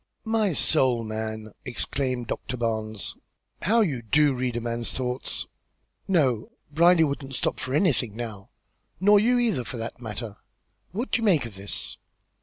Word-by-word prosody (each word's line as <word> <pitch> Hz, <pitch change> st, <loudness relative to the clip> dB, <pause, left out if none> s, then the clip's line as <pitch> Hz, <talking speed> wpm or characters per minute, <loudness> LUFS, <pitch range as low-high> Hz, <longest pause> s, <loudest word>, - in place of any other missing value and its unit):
"My 220 Hz, -4 st, +2 dB
soul, 130 Hz, -6 st, +3 dB
man!" 110 Hz, 0 st, -4 dB
exclaimed 130 Hz, 0 st, -1 dB
Doctor 125 Hz, +2 st, -4 dB
Barnes, 110 Hz, -3 st, -2 dB, 0.5 s
"how 225 Hz, +6 st, +3 dB
you 145 Hz, -, 0 dB
do 145 Hz, +6 st, +3 dB
read 125 Hz, -1 st, -2 dB
a -, -, 0 dB
man's 120 Hz, 0 st, -3 dB
thoughts! 125 Hz, 0 st, -2 dB, 0.6 s
No! 135 Hz, -, +2 dB, 0.2 s
Brierly 170 Hz, +2 st, +5 dB
wouldn't 140 Hz, -2 st, -2 dB
stop -, -, -1 dB
for 130 Hz, +2 st, -2 dB
anything 135 Hz, -, +2 dB
now. 110 Hz, -4 st, -6 dB, 0.5 s
Nor 205 Hz, +2 st, +6 dB
you, 245 Hz, +4 st, +3 dB
either, 225 Hz, -, +1 dB
for 120 Hz, +2 st, -6 dB
that 115 Hz, +2 st, -6 dB
matter, 110 Hz, -2 st, -5 dB, 0.5 s
What 230 Hz, +9 st, -3 dB
do -, -, +3 dB
you -, -, -3 dB
make 180 Hz, -, +3 dB
of 115 Hz, -, -8 dB
this?" 100 Hz, +1 st, -1 dB
125 Hz, 155 wpm, -26 LUFS, 115-165 Hz, 0.6 s, Nor